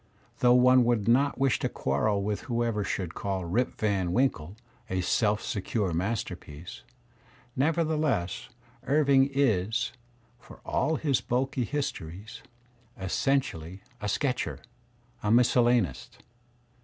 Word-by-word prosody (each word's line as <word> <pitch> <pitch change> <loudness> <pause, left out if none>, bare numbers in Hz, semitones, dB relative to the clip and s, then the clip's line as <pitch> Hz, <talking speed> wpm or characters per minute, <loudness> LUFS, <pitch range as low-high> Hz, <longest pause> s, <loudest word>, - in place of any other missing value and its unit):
Though 125 0 +5
one 125 0 +6
would 115 -4 +1
not 135 +4 +3
wish 135 -2 +2
to - - -1
quarrel 100 +10 0
with 105 0 -2
whoever 115 -3 0
should 95 -3 -3
call 95 -2 -3
"Rip 115 +9 0
Van 100 -5 0
Winkle" 105 -9 0 0.3
a 95 0 -1
self 105 +3 +1
secure 100 -2 -2
masterpiece, 90 -4 -4 0.7
never 160 +5 +2
theless 150 - -1 0.4
Irving 140 -1 +4
is, 110 -4 +1 0.5
for 125 - -15
all 160 - 0
his 145 -5 0
bulky 130 0 -1
histo>ries, 105 - -5 0.6
essentially 95 - -1 0.2
a 105 - -2
sketcher, 130 +3 -1 0.6
a 105 - -1
miscellanist. 120 - +2
115 Hz, 115 wpm, -28 LUFS, 95-135 Hz, 0.7 s, one